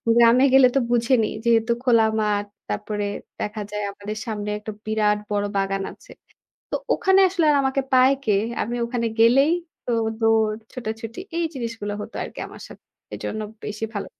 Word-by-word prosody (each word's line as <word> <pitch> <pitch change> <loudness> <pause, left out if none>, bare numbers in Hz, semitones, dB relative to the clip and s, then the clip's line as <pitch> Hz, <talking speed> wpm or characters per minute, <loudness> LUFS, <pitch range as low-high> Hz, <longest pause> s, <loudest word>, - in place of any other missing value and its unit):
গ্রামে 235 +3 +6
গেলে 265 -1 +8
তো - - +5
বুঝেনই। 240 -1 +2
যেহেতু 230 0 +3
খোলা 235 -3 +5 0.2
মাঠ, 205 -1 0 0.2
তারপরে 205 - -2 0.3
দেখা 210 +1 -3
যায় 210 0 -3
আমাদের 205 +2 -7
সামনে 210 -2 -4
একটা 215 +1 -6
বিরাট 210 -1 +2
বড় 205 0 +1
বাগান 195 0 0
আছে। - - -17 0.6
তো - - -3 0.2
ওখানে 380 +1 +4
আসলে 355 -3 0
আর 290 - +4
আমাকে 265 0 +1
পায় 255 +1 +6
কে? 215 - +2 0.3
আমি 240 +2 -3
ওখানে 235 -1 -2
গেলেই 270 +7 +5 0.3
তো - - -4 0.3
দৌড়, 220 -1 +3 0.2
ছোটাছুটি 225 +2 -6 0.2
এই 340 - +1
জিনিসগুলো 230 -4 -4
হতো - - -8
আরকি - - -7
আমার - - -12
সাথে। - - -14 0.3
এজন্য 215 - -4 0.2
বেশি 215 +1 -4
ভালো। 200 - -3
225 Hz, 165 wpm, -23 LUFS, 210-250 Hz, 0.6 s, গেলে